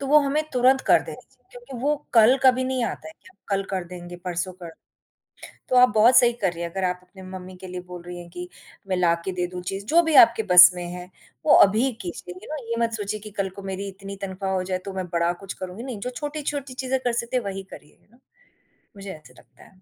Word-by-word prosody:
तो 275 - -4
वो 300 +2 +6
हमें 290 +2 0
तुरंत 255 +2 +4
कर - - +6
देने - - -9
चाहिए - - -33
क्योंकि 485 - -10
वो 295 +2 +2 0.2
कल 230 +3 +7
कभी 260 -1 +4
नहीं 255 -1 -1
आता 210 - -5
है - - -11
कि - - -17
हम - - -27
कल 195 -1 0
कर 190 -2 -2
देंगे, 175 0 -9
परसों 175 +1 -4
कर 170 - -7 1.0
तो 255 - +1
आप 250 0 +7
बहुत 230 +4 +6
सही 240 -1 +5
कर 200 -7 -1
रही 170 0 -7
हैं 170 - -4
अगर 190 +2 -3
आप 180 0 -1
अपने 185 +1 -15
मम्मी 185 0 -9
के 185 - -10
लिए 180 0 -6
बोल 180 -1 -8
रही 175 0 -8
हैं 175 -1 -10
कि 180 +1 -8 0.4
मैं 185 - 0
लाके 170 +1 +1
दे 180 -1 -2
दूँ 180 0 -7
चीज़। 195 +2 -5
जो 335 +8 +5
भी 325 -2 0
आपके 230 -1 +3
बस 180 -3 +9
में 180 -1 -5
है, 180 0 -8 0.4
वो - - +6
अभी 215 +5 +5
ही 270 - 0
कीजिए 175 0 -7
यू 185 - -13
नो? 295 - -6
ये 230 - 0
मत 230 - -2
सोचिए 210 -1 -4
कि 210 +1 -10
कल 195 -1 -2
को - - -7
मेरी 195 +1 -5
इतनी 195 +1 -9
तनख़्वाह 190 0 -3
हो 185 -1 0
जाए 185 0 -2
तो 195 - -4
मैं 185 -1 -3
बड़ा 170 0 +1
कुछ 195 - -5
करूँगी। 185 +4 -7
नहीं, 255 -5 -6
जो 250 - -4
छोटी-छोटी 290 -1 -5
चीज़ें 260 +1 -1
कर 245 - +1
सकते 235 +2 -1
वही 195 -4 -5
करिए, 150 - -14 1.0
मुझे 195 -1 -8
ऐसे 155 - -15
लगता - - -20
है। 185 -1 -21
195 Hz, 250 wpm, -24 LUFS, 180-250 Hz, 1.0 s, बस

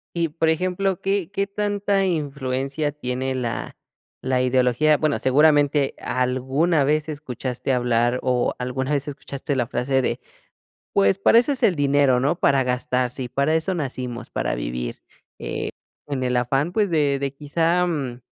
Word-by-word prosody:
Y 170 -1 +1
por 160 +1 +1
ejemplo, 185 +3 0
¿qué 195 -2 -1
qué 200 -1 0
tanta 200 -1 0
influencia 145 -3 -2
tiene 130 -2 -3
la 120 -3 -4 0.4
la 130 -1 0
ideología? 130 +4 +3
Bueno, 155 -2 +1
seguramente 145 0 +3
alguna 130 +5 +1
vez 150 +2 +1
escuchaste 135 -3 -4
hablar 120 0 +1
o 125 -1 +1
alguna 130 +3 -2
vez 140 0 -1
escuchaste 140 0 -4
la 120 -2 +1
frase 130 +2 0
de, - - -1 0.7
pues, 100 0 +3
para 225 - +5
eso 245 +4 0
es 275 - 0
el 185 - +4
dinero, 140 -3 +3
¿no? 145 +7 0
Para 140 -1 +3
gastarse, 125 0 -1
y - - -4
para 140 +5 +1
eso 160 +4 0
nacimos, 125 -6 -4
para - - -2
vivir, - - -4 0.4
eh, - - -4 0.4
en 135 -3 -2
el 125 -1 +1
afán, 135 +6 0
pues, 205 -5 +1
de 145 -3 +2
de 140 0 -3
quizá, 165 +5 +1
mm, 135 -7 -3
140 Hz, 155 wpm, -23 LUFS, 125-160 Hz, 0.7 s, para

